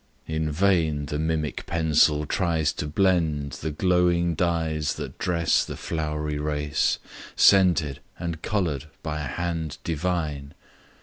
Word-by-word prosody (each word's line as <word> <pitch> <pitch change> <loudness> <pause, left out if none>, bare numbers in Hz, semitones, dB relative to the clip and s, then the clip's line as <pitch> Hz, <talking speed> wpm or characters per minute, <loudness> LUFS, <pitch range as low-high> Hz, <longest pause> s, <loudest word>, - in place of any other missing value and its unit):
In 80 -1 -2
vain 80 -4 +2
the 75 +1 -3
mimic 80 -1 -2
pencil 75 -2 +3
tries 80 -3 0
to 75 - -4
blend 80 -4 +1
The 80 - -2
glowing 85 +1 +2
dyes 80 -4 0
that - - -7
dress 85 -2 +2
the - - -7
flowery 75 -2 -3
race, 75 -1 0 0.4
Scented 85 -8 +4 0.2
and 85 -3 -4
colour'd 80 -10 -1 0.2
by 75 -2 -3
a - - -3
hand 80 +1 -3
divine! 80 -4 -2
80 Hz, 125 wpm, -25 LUFS, 75-85 Hz, 0.4 s, Scented